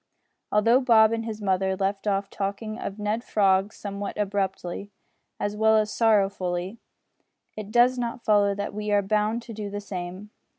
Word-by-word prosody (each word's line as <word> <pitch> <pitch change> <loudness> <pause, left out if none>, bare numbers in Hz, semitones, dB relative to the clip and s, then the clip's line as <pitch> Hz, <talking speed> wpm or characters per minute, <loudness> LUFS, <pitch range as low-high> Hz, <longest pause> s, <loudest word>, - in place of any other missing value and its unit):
Although 230 +5 +4
Bob 225 -4 +5
and 225 0 -2
his 220 -2 -6
mother 190 0 +1
left 195 +2 -2
off 195 0 0
talking 205 +3 -4
of 200 - -5
Ned 210 +2 -2
Frog 195 -2 +2
somewhat 200 -1 -6
abruptly, 200 -2 -2 0.5
as 205 0 -2
well 220 +1 +4
as 215 -1 0
sorrowfully, 195 -3 +1 0.8
it 215 -1 -7
does 245 +2 +4
not 235 0 -4
follow 205 -2 +3
that 200 0 -4
we 210 0 -4
are 205 -1 +3
bound 215 +3 0
to 230 - -9
do 210 -1 -5
the 205 0 -4
same. 190 +1 -7
205 Hz, 165 wpm, -25 LUFS, 195-220 Hz, 0.8 s, Bob